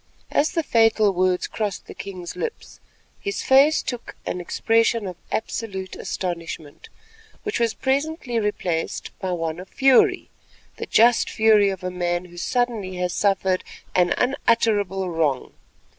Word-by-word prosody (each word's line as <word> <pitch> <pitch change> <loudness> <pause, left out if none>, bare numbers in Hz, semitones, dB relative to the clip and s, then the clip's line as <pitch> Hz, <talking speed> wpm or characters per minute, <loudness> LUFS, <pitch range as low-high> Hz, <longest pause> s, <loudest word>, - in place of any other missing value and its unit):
As 300 - +2
the 330 - 0
fatal 225 -5 +3
words 185 0 +1
crossed 210 -3 -3
the - - -10
king's 185 -3 -7
lips, 460 -1 -6 0.4
his 400 0 -3
face 275 +4 +5
took 245 -2 -6
an 180 - -3
expression 225 +4 +1
of 185 -2 -5 0.2
absolute 195 -4 -3
astonishment, 170 -4 -5 0.5
which 420 - -2
was 230 -2 +1
presently 270 -2 -1
replaced 185 -6 -2
by 190 -1 -2
one 165 -1 -2
of 185 - -10
fury—the 270 -2 +1
just 235 +1 +4
fury 215 -2 +4
of 190 -2 -5
a 185 - -2
man 175 0 -1
who 175 -1 -14
suddenly 225 -2 -1
has 180 0 -2
suffered 190 -2 +1 0.3
an 180 -1 +3
unutterable 215 -7 +1
wrong. 160 -6 -1
200 Hz, 135 wpm, -23 LUFS, 180-235 Hz, 0.5 s, face